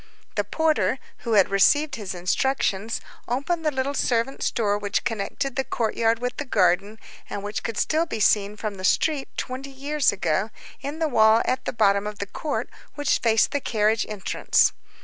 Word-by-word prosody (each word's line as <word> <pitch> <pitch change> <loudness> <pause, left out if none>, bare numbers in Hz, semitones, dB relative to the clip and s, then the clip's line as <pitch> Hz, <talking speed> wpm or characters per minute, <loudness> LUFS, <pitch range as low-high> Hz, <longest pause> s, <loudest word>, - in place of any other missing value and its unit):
The 205 - 0
porter, 310 - +1 0.2
who 230 - -2
had 200 -3 +5
received 290 +9 +3
his 200 -6 -5
instructions, 205 +3 0 0.3
opened 285 +8 -1
the 310 - +3
little 270 0 -2
servant's 250 0 0
door 210 -4 0
which 205 -1 -1
connected 240 +5 -3
the 265 - 0
courtyard 225 -1 0
with 250 +1 -4
the - - -2
garden, 200 -3 +1 0.3
and 200 - -5
which 205 +1 -3
could 230 - -4
still 320 +2 +1
be 225 - -4
seen 205 0 +2
from 210 -2 -4
the 185 - -8
street 285 - +1
twenty 260 +2 -4
years 280 +1 +1
ago, 190 +1 0 0.3
in 285 +3 -5
the 320 -1 +1
wall 220 -4 +5
at 260 0 -1
the - - -1
bottom 200 -2 +2
of 210 -1 -6
the 200 - -3
court, 285 +8 -3 0.3
which 290 -2 +1
faced 225 -2 +3
the 285 - -1
carriage 215 -1 +1
entrance. 210 -3 +2
230 Hz, 180 wpm, -24 LUFS, 205-275 Hz, 0.3 s, had